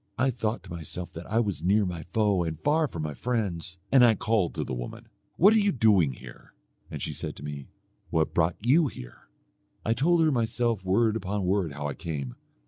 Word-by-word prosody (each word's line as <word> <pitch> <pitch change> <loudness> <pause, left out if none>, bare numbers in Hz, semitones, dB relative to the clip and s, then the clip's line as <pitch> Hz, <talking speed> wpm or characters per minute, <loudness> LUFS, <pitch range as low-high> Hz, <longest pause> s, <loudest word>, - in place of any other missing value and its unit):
I 130 +2 +2
thought 115 -2 -2
to - - -12
myself 85 +1 -6
that 85 +2 -8
I 115 - +3
was 105 -5 -1
near 100 +3 +3
my 90 -3 -4
foe 105 -5 +2
and 80 -2 -4
far 155 +2 +2
from 85 - -5
my 75 -1 -3
friends, 95 -6 -3
and 135 -2 +7
I 115 -2 +6
called 105 -4 0
to - - -1
the - - -5
woman, - - -6 0.3
'What 200 +6 +6
are 220 - +5
you 205 -1 +2
doing 100 - +3
here?' 65 0 -13 0.3
And - - -6
she - - -3
said - - -5
to - - -11
me 70 -2 -6 0.4
'What 80 -1 0
brought 85 0 +2
you 145 +8 +4
here?' - - -11 0.6
I 115 - +2
told 165 +7 +3
her 155 - +3
myself 115 -4 0
word 105 +4 +2
upon 100 -2 -2
word 90 -5 0
how 75 +1 -4
I 70 - -3
came. 70 -8 -5
100 Hz, 215 wpm, -27 LUFS, 80-120 Hz, 0.6 s, and